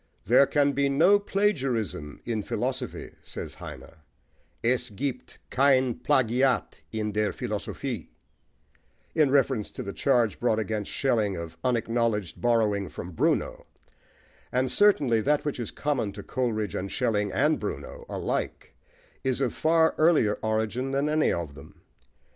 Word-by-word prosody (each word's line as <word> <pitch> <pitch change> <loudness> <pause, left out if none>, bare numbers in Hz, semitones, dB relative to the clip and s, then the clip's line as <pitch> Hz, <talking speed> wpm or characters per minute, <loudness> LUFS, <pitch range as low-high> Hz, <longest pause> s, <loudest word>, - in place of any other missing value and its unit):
"There 130 +4 +6
can 145 -1 +3
be 140 0 +1
no 170 +9 +5
plagiarism 135 - -1
in 115 -2 -1
philosophy," - - -3
says - - -7
Heine: - - -10 0.7
Es 125 +1 +1
giebt 130 +6 -5
kein 130 -2 +4
Plagiat 125 0 +1
in 110 -1 -2
der 105 0 0
Philosophie, - - -4 1.0
in 150 -3 +4
reference 135 -5 +2
to - - -7
the 100 - -5
charge 120 -6 +2
brought 115 -3 +2
against 110 -1 -2
Schelling 110 -7 +1
of 85 -1 -7
unacknowledged 115 -5 0
borrowing 110 -5 +2
from 90 - -7
Bruno; 80 - 0 0.8
and 130 0 +1
certainly 140 - +4
that 150 +5 +1
which 145 -3 -2
is 120 - -2
common 135 -8 -1
to 100 0 -8
Coleridge 110 -6 -2
and 95 +1 -4
Schelling 105 -5 0
and - - +2
Bruno - - -6
alike - - -3 0.5
is 130 -1 0
of 130 -4 0
far 160 0 +3
earlier 155 -10 +4
origin 110 +4 -1
than 140 +2 0
any 155 0 +2
of 85 -4 -3
them. 70 -1 -14
120 Hz, 135 wpm, -27 LUFS, 105-140 Hz, 1.0 s, There